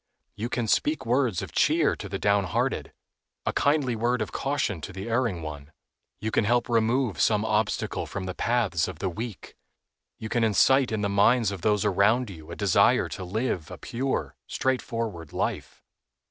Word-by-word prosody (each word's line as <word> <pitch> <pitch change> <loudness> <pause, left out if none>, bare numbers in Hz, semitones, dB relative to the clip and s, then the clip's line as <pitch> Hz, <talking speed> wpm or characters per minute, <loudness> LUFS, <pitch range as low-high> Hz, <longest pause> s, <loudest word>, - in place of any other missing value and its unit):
You 110 +4 -4
can 120 -2 -1
speak 150 +7 +1
words 120 -5 +1
of - - -7
cheer - - +3
to 100 - -7
the 95 - -3
downhearted, 100 -1 0 0.5
a - - 0
kindly 140 -4 +2
word 120 +3 0
of - - -8
caution 135 - -1
to 95 - -6
the 95 +3 -7
erring 115 -8 0
one. 75 -1 -7 0.5
You 110 +1 -3
can - - +2
help 120 +3 +2
remove 115 - +1
some 105 0 +3
obstacle 110 0 -1
from 95 - -5
the 95 0 -4
paths 110 -8 +1
of - - -7
the 95 +3 -2
weak. 110 +2 -7 0.6
You 110 - -6
can 120 +1 0
incite 130 +4 +4
in 110 -2 -1
the 100 - +1
minds 100 +2 +3
of 95 -3 -6
those 105 0 +2
around 105 +4 +2
you 80 -4 -12
a - - -6
desire - - +3
to 95 - -6
live 95 -3 -2
a - - -8
pure, 130 +3 -3
straightforward 115 - -2
life. - - -3
110 Hz, 175 wpm, -26 LUFS, 95-120 Hz, 0.6 s, incite